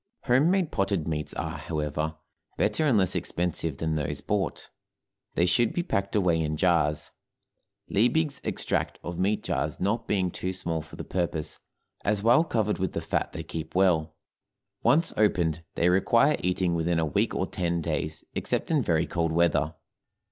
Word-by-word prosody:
Home 135 Hz, +5 st, +4 dB
made 185 Hz, -4 st, +1 dB
potted 95 Hz, -5 st, 0 dB
meats 75 Hz, -2 st, -2 dB
are, -, -, -4 dB
however, 75 Hz, 0 st, -2 dB, 0.4 s
better 155 Hz, -, +2 dB
and 125 Hz, -6 st, +4 dB
less 95 Hz, -3 st, +3 dB
expensive 85 Hz, -4 st, -2 dB
than 80 Hz, +1 st, -1 dB
those 75 Hz, -2 st, -2 dB
bought; -, -, -2 dB, 0.6 s
they 85 Hz, -, +3 dB
should 110 Hz, +6 st, +2 dB
be 175 Hz, -, 0 dB
packed 100 Hz, -, -1 dB
away 90 Hz, -5 st, +3 dB
in 75 Hz, -1 st, -1 dB
jars, 75 Hz, -4 st, +2 dB, 0.8 s
Liebig's 140 Hz, +7 st, +1 dB
extract -, -, -1 dB
of 85 Hz, 0 st, -5 dB
meat 100 Hz, +3 st, +1 dB
jars 75 Hz, 0 st, -2 dB
not 100 Hz, +5 st, 0 dB
being 95 Hz, -3 st, +1 dB
too 95 Hz, +2 st, -3 dB
small 85 Hz, -3 st, -2 dB
for 80 Hz, -, -12 dB
the -, -, -6 dB
purpose, 85 Hz, -4 st, -2 dB, 0.4 s
as, 105 Hz, 0 st, 0 dB
while 120 Hz, +7 st, +6 dB
covered 110 Hz, -9 st, 0 dB
with 95 Hz, -2 st, -1 dB
the -, -, -1 dB
fat -, -, -1 dB
they -, -, -6 dB
keep 80 Hz, 0 st, -6 dB
well; 80 Hz, -4 st, +2 dB, 0.7 s
once 165 Hz, +3 st, +3 dB
opened, 85 Hz, -6 st, +2 dB
they 85 Hz, -, +2 dB
require 115 Hz, +10 st, +4 dB
eating 90 Hz, -1 st, 0 dB
within 85 Hz, 0 st, +1 dB
a 80 Hz, -, +2 dB
week 75 Hz, -, 0 dB
or -, -, 0 dB
ten 85 Hz, -1 st, -1 dB
days, 80 Hz, -1 st, -3 dB
except -, -, -1 dB
in 155 Hz, -3 st, +3 dB
very 85 Hz, -6 st, +1 dB
cold 85 Hz, -1 st, -1 dB
weather. 85 Hz, -1 st, +2 dB
90 Hz, 170 wpm, -27 LUFS, 80-105 Hz, 0.8 s, while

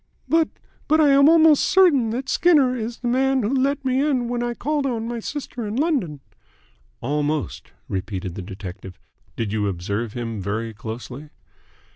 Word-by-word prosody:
"But 325 Hz, -1 st, +2 dB, 0.4 s
but 310 Hz, +1 st, +3 dB
I 300 Hz, -2 st, +5 dB
am 280 Hz, +1 st, +6 dB
almost 320 Hz, -3 st, +6 dB
certain 315 Hz, -12 st, +4 dB
that 250 Hz, +4 st, -3 dB
Skinner 285 Hz, -8 st, +3 dB
is 230 Hz, 0 st, -4 dB
the 245 Hz, -, -2 dB
man 265 Hz, +1 st, +2 dB
who 215 Hz, +6 st, 0 dB
let 275 Hz, +1 st, 0 dB
me 260 Hz, +1 st, +2 dB
in 260 Hz, -5 st, 0 dB
when 240 Hz, 0 st, -2 dB
I 240 Hz, 0 st, -2 dB
called 290 Hz, 0 st, -1 dB
on 230 Hz, -3 st, -2 dB
my 235 Hz, 0 st, -4 dB
sister 250 Hz, -1 st, -6 dB
in 205 Hz, -, -4 dB
London." 250 Hz, -, -1 dB, 0.8 s
"Almost," 150 Hz, +3 st, -2 dB, 0.2 s
repeated 95 Hz, -2 st, -4 dB
the 95 Hz, -, -6 dB
detective. 95 Hz, -1 st, -9 dB, 0.4 s
"Did 110 Hz, -3 st, -3 dB
you 105 Hz, -2 st, 0 dB
observe 100 Hz, +4 st, -3 dB
him 115 Hz, -4 st, -4 dB
very 110 Hz, +4 st, -3 dB
closely?" 120 Hz, +7 st, -8 dB
235 Hz, 165 wpm, -22 LUFS, -, 0.8 s, am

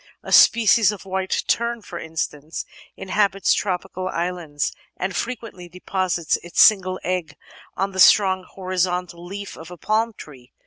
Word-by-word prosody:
A -, -, -8 dB
species 225 Hz, -2 st, +6 dB
of 205 Hz, -2 st, -9 dB
White 190 Hz, 0 st, -2 dB
Tern, 235 Hz, -1 st, 0 dB
for 175 Hz, -, -8 dB
instance, 160 Hz, -1 st, -5 dB, 0.3 s
inhabits 195 Hz, 0 st, +1 dB
tropical 185 Hz, 0 st, -3 dB
islands 170 Hz, -5 st, -3 dB, 0.3 s
and 185 Hz, 0 st, -3 dB
frequently 225 Hz, -7 st, -5 dB
deposits 180 Hz, -2 st, -1 dB
its 175 Hz, -, -6 dB
single 185 Hz, -3 st, +5 dB
egg 180 Hz, -4 st, -3 dB, 0.4 s
on 195 Hz, +1 st, -1 dB
the 190 Hz, -, -6 dB
strong 190 Hz, -1 st, +5 dB
horizontal 180 Hz, -2 st, -3 dB
leaf 200 Hz, +3 st, -7 dB
of 160 Hz, 0 st, -11 dB
a 180 Hz, -, -10 dB
palm 220 Hz, +5 st, 0 dB
tree. 135 Hz, -9 st, -14 dB
185 Hz, 140 wpm, -22 LUFS, 175-200 Hz, 0.4 s, species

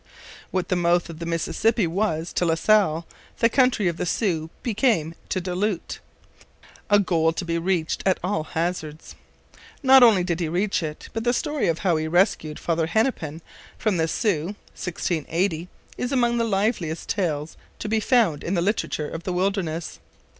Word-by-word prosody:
What 185 Hz, -1 st, -2 dB
the 185 Hz, -, +2 dB
mouth 175 Hz, 0 st, +2 dB
of 160 Hz, -, -11 dB
the 170 Hz, -, -5 dB
Mississippi 185 Hz, +6 st, +1 dB
was 170 Hz, -2 st, -1 dB
to -, -, 0 dB
La 165 Hz, -2 st, +2 dB
Salle 170 Hz, -3 st, +3 dB, 0.3 s
the 230 Hz, -, +4 dB
country 250 Hz, -5 st, +3 dB
of 170 Hz, -1 st, -1 dB
the 180 Hz, -, -2 dB
Sioux 165 Hz, -6 st, 0 dB
became 215 Hz, -, +1 dB, 0.2 s
to 185 Hz, -, 0 dB
Du 180 Hz, 0 st, -4 dB
Lhut 195 Hz, 0 st, -2 dB, 0.9 s
a 205 Hz, -, +6 dB
goal 170 Hz, -5 st, +2 dB
to 175 Hz, -, -4 dB
be 170 Hz, 0 st, -1 dB
reached 170 Hz, -2 st, -1 dB
at 190 Hz, -1 st, +2 dB
all 180 Hz, -4 st, 0 dB
hazards. 160 Hz, -1 st, -4 dB, 0.7 s
Not 265 Hz, 0 st, +8 dB
only 220 Hz, -7 st, +6 dB
did 175 Hz, -1 st, -1 dB
he 165 Hz, -3 st, -1 dB
reach 190 Hz, +5 st, 0 dB
it, 155 Hz, -2 st, -6 dB
but 225 Hz, -, -3 dB
the 240 Hz, 0 st, +2 dB
story 295 Hz, +2 st, -1 dB
of 165 Hz, -1 st, +1 dB
how 175 Hz, -4 st, +3 dB
he 155 Hz, 0 st, -2 dB
rescued 165 Hz, -3 st, +1 dB
Father 165 Hz, -1 st, 0 dB
Hennepin 165 Hz, -, -1 dB, 0.3 s
from 210 Hz, -5 st, 0 dB
the 160 Hz, 0 st, +1 dB
Sioux 185 Hz, 0 st, -1 dB, 0.2 s
(1680) 175 Hz, 0 st, -2 dB, 0.3 s
is 250 Hz, -, -2 dB
among 240 Hz, -3 st, +2 dB
the 230 Hz, -, +2 dB
liveliest 195 Hz, -6 st, -1 dB
tales 160 Hz, -6 st, -2 dB, 0.2 s
to -, -, -5 dB
be 220 Hz, +1 st, +1 dB
found 215 Hz, -, +2 dB
in 180 Hz, -, -1 dB
the 170 Hz, -, +1 dB
literature 185 Hz, -6 st, -1 dB
of 165 Hz, -, -6 dB
the 180 Hz, +1 st, -3 dB
wilderness. 180 Hz, -3 st, -2 dB
180 Hz, 175 wpm, -24 LUFS, 165-210 Hz, 0.9 s, Not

